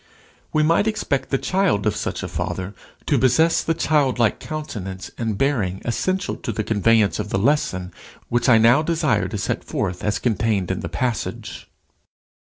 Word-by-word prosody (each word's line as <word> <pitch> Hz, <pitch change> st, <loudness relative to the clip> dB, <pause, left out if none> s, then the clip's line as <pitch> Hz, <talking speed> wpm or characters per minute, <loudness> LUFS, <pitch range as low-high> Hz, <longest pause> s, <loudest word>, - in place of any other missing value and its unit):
We 155 Hz, -, +2 dB
might 165 Hz, +7 st, +3 dB
expect 210 Hz, -10 st, -1 dB
the 135 Hz, -, +1 dB
child 180 Hz, -, +1 dB
of 105 Hz, -, +1 dB
such -, -, -3 dB
a -, -, -3 dB
father 95 Hz, +2 st, -4 dB, 0.3 s
to -, -, +2 dB
possess 145 Hz, +6 st, +3 dB
the 165 Hz, -, 0 dB
childlike 135 Hz, -8 st, +2 dB
countenance 105 Hz, -12 st, -6 dB
and 110 Hz, -3 st, -2 dB
bearing 105 Hz, -9 st, 0 dB
essential 185 Hz, +11 st, -1 dB
to -, -, -4 dB
the 110 Hz, 0 st, -2 dB
conveyance 110 Hz, 0 st, +2 dB
of 105 Hz, 0 st, -3 dB
the -, -, 0 dB
lesson 95 Hz, -7 st, 0 dB, 0.3 s
which 120 Hz, +2 st, +1 dB
I 115 Hz, -, +7 dB
now 115 Hz, +6 st, +5 dB
desire 155 Hz, -, +1 dB
to 105 Hz, +2 st, -4 dB
set 100 Hz, -, -2 dB
forth 90 Hz, 0 st, -3 dB
as 105 Hz, -, 0 dB
contained 105 Hz, -5 st, 0 dB
in 95 Hz, -, -2 dB
the 85 Hz, -, -5 dB
passage. 110 Hz, +8 st, -3 dB
115 Hz, 170 wpm, -22 LUFS, 100-150 Hz, 0.3 s, I